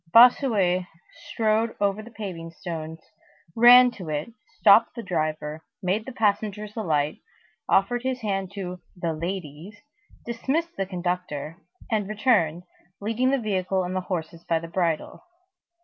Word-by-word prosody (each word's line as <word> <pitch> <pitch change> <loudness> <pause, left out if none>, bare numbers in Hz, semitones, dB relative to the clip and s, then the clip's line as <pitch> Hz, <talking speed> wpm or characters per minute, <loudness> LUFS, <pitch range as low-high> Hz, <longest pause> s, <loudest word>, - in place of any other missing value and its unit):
Bossuet 215 -7 +5 0.4
strode 225 0 +1
over 200 +1 +1
the 225 - -11
paving 190 -7 -7
stones, 160 -2 -7 0.5
ran 245 +2 +8
to 185 -8 -9
it, 150 +9 -3 0.2
stopped - - +6
the 235 - -6
driver, 155 -3 -2 0.2
made 200 +6 0
the - - -5
passengers 210 -2 -1
alight, 155 -9 0 0.5
offered 240 +5 +3
his 260 0 -2
hand 195 -3 -2
to 180 -3 -6
"the 170 -2 -2
ladies," 170 +2 -6 0.5
dismissed 275 +9 -2
the 195 - -2
conductor, 175 -4 -3 0.3
and 210 -3 0
returned, 205 -7 +2 0.4
leading 225 +5 0
the 275 - +2
vehicle 190 -5 -1
and 180 +1 -4
the 185 - 0
horses 170 -3 -5
by 165 - +1
the 165 +1 -6
bridle. 165 -2 -2
195 Hz, 135 wpm, -25 LUFS, 165-220 Hz, 0.5 s, ran